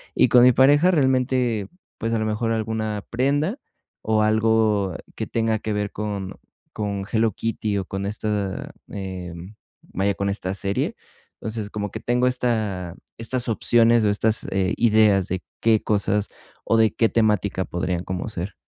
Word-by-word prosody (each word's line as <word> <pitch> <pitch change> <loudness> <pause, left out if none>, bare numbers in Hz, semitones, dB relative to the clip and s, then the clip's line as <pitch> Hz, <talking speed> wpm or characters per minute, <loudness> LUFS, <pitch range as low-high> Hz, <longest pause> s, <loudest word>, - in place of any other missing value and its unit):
Y - - +5
con 125 -1 +7
mi 125 - +8
pareja 145 +8 +5
realmente, 130 - +1 0.3
pues, 115 - -2
a 115 - +1
lo 110 - -1
mejor 110 +1 -1
alguna 110 -2 -2
prenda 145 - 0 0.4
o 110 0 +1
algo 110 -3 +2 0.2
que - - -4
tenga 110 -1 0
que 110 - -4
ver 105 0 -2
con 100 -3 -4 0.4
con 100 -2 -3
Hello 110 0 +2
Kitty, 110 0 -2
o, 95 - -2
con 95 +1 -4
esta, 105 -1 -3 0.2
eh, 95 -3 -6 0.5
vaya, 100 +2 -1
con 100 - -2
esta 95 -2 -3
serie. 100 +1 -1 0.4
Entonces, 110 -2 -5
como 105 -1 -4
que - - -6
tengo 125 +1 +1
esta 110 -8 -1 0.2
estas 120 +2 -3
opciones 115 +1 +4
o 105 - +3
estas, 110 +2 +1
eh, 95 +1 +1
ideas 105 -4 +4
de 95 0 -2 0.2
qué 110 -2 +3
cosas 105 -1 +1 0.4
o - - +2
de 110 -1 +4
qué 115 - +3
temática 105 -4 +1
podrían 90 0 -2
como 95 +2 -4
ser. 95 -1 -5
110 Hz, 160 wpm, -23 LUFS, 100-115 Hz, 0.5 s, mi